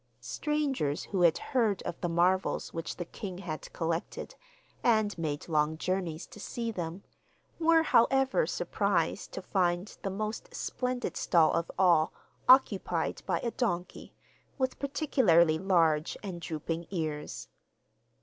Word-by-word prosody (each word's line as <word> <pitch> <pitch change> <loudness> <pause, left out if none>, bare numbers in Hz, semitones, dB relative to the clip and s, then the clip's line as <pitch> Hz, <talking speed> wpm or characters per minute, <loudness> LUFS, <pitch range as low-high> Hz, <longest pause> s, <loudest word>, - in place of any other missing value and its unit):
Strangers 275 - -1
who 190 -3 -2
had 170 -3 +5 0.2
heard 225 -7 +2
of 170 - -5
the 175 - -1
marvels 180 +3 +1
which 165 -1 -4
the 175 - -5
king 185 +1 -7
had 170 -5 -6
collected, 165 +1 -3 0.5
and 215 -3 +3
made 150 -3 -3
long 155 -1 +1
journeys 175 -2 -2
to - - -14
see 230 +2 -3
them, 175 -1 -5 0.6
were, 330 0 +5
however, 270 - +3
surprised - - -1
to - - -6
find 180 0 0
the 195 - -2
most 215 - -4
splendid 250 - -2
stall 165 -2 +3
of 165 - -1
all 175 -4 +4 0.4
occupied 195 -10 +4
by 175 -3 +1
a 235 - -2
donkey, 180 -9 -3 0.4
with 260 -2 -1
particularly 195 - +3
large 165 -5 +2
and 180 -4 -6
drooping 165 +1 -4
ears. 155 -5 -4
185 Hz, 130 wpm, -30 LUFS, 165-230 Hz, 0.6 s, had